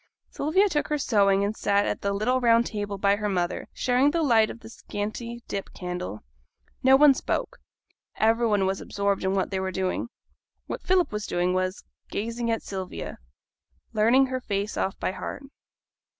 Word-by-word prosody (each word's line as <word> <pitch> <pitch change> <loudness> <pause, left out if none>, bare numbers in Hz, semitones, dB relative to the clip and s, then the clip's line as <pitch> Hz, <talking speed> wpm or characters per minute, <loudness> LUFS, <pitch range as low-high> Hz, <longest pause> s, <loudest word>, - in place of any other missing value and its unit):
Sylvia 375 +8 +2
took 300 -6 -1
her 300 - 0
sewing 200 -7 +3
and 205 +2 -1
sat 200 -1 +2
at - - -2
the 200 - 0
little 230 +6 +1
round 235 -1 +4
table 205 -2 -4
by 200 +1 +3
her 210 0 -2
mother, 180 -2 -1
sharing 255 +3 +2
the 330 +2 0
light 225 -6 +4
of 230 - -9
the 225 - -11
scanty 230 +3 -5
dip 195 - -4
candle. 180 - -5 0.6
No 265 +1 +6
one 290 0 +7
spoke. - - -3 0.6
Every 225 +2 +3
one 205 -3 +2
was 190 0 -1
absorbed 200 -1 -1
in 190 +1 +1
what 190 - 0
they 190 - -1
were 190 0 -2
doing. 190 +5 -2 0.6
What - - -5
Philip 365 -1 +2
was 210 -1 -4
doing 180 +1 0
was, 185 +1 -1 0.3
gazing 230 +2 -3
at 225 - -1
Sylvia 190 -2 -6 0.7
learning 230 +5 +5
her 260 0 -3
face 200 -2 -2
off 190 - -1
by - - -1
heart. 275 - -6
210 Hz, 180 wpm, -26 LUFS, 195-245 Hz, 0.7 s, one